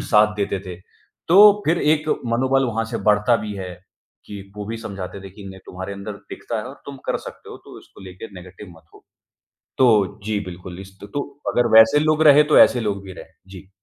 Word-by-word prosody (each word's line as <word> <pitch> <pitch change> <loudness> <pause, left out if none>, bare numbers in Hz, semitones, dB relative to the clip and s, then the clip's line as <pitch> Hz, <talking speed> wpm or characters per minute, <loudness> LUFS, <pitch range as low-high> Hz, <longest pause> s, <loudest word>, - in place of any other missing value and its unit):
साथ 105 -1 +3
देते 100 -1 -2
थे। 90 -1 -7 0.5
तो 175 +4 +5 0.3
फिर 165 +3 +2
एक 155 0 -2 0.2
मनोबल 130 +3 +1
वहाँ 115 -1 -2
से - - -2
बढ़ता 105 +3 +3
भी 105 - -5
है 95 -2 -6 0.6
कि 100 -1 -9 0.2
वो 105 - -6
भी 115 +2 -5
समझाते 100 -3 -8
थे 95 - -10
कि 100 +1 -14
नहीं 95 0 -12
तुम्हारे 95 +2 -7
अंदर 100 +2 -7 0.2
दिखता 115 - -6
है 105 - -5
और 135 - -13
तुम 140 -1 -8
कर - - 0
सकते - - -14
हो - - -9
तो - - -13
इसको - - -18
लेके 95 +4 -10
नेगेटिव 90 +2 -13
मत 80 - -20
हो। - - -19 0.7
तो 110 -8 +2
जी, 105 -1 -2
बिल्कुल। 90 +1 -9
इस 95 0 -13
त - - -11
तो 145 - -1 0.3
अगर 120 - +2
वैसे 110 +6 +6
लोग 155 0 +1
रहे, 145 +1 +7
तो 150 - +4
ऐसे 125 - +5
लोग 100 -3 -3
भी 95 - -10
रहे। - - -11 0.2
जी। 95 0 -13
105 Hz, 215 wpm, -21 LUFS, 95-120 Hz, 0.7 s, रहे